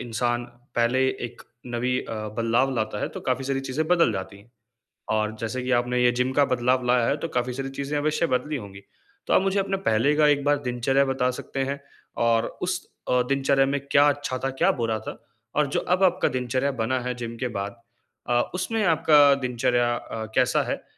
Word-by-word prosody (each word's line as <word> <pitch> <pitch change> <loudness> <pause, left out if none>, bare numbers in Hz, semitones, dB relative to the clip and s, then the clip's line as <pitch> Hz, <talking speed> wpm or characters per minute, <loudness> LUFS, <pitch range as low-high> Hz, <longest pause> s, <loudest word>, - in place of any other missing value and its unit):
इंसान 120 0 -1 0.3
पहले 120 +2 +2
एक 120 -2 -6 0.2
नवी 125 +1 -1
अ, - - -8 0.3
बदलाव 115 +4 +2
लाता 110 -2 -2
है, - - -1
तो - - -8
काफ़ी 130 +1 -1
सारी 135 0 -1
चीज़ें 135 +4 -2
बदल 170 -9 +4
जाती 95 0 -6
हैं। 105 +4 -20 0.6
और 110 0 0
जैसे 115 +3 -3
कि 125 - -3
आपने 125 0 0
ये 120 - +5
जिम 130 +1 +1
का 145 +1 +4
बदलाव 125 +1 +1
लाया 125 -1 +3
है, 140 - +1
तो 165 +2 -4
काफ़ी 125 -3 -1
सारी 135 +1 -4
चीज़ें 140 +1 -2
अवश्य 155 +3 +1
बदली 150 +4 -4
होंगी, 100 -4 -9 0.4
तो - - +2
आप - - +5
मुझे 195 +1 +1
अपने 195 0 -1
पहले 115 +7 +3
का 150 -1 +5
एक 145 -1 +2
बार 145 0 +3
दिनचर्या 130 +3 +2
बता 130 -1 +1
सकते 135 -1 -3
हैं, 140 0 -4 0.4
और 115 -1 +2 0.2
उस 180 0 -1 0.3
अ, 125 0 +3
दिनचर्या 135 0 +2
में 140 +1 -1
क्या 145 +1 +6
अच्छा 145 -2 -3
था, 135 - +1
क्या 135 - +2
बुरा 115 -1 0
था - - -8 0.4
और 150 - +3
जो - - +2
अब 180 +2 0
आपका 185 0 +3
दिनचर्या 130 +2 -1
बना 130 +3 0
है 125 0 -3
जिम 115 -1 -6
के 125 - -1
बाद 100 +4 -5 0.5
अ, 120 0 +3
उसमें 220 +4 -1
आपका 150 -4 +5
दिनचर्या 120 0 +1
अ, 110 -1 -6
कैसा 125 -1 +3
है? - - -3
130 Hz, 205 wpm, -25 LUFS, 120-140 Hz, 0.6 s, क्या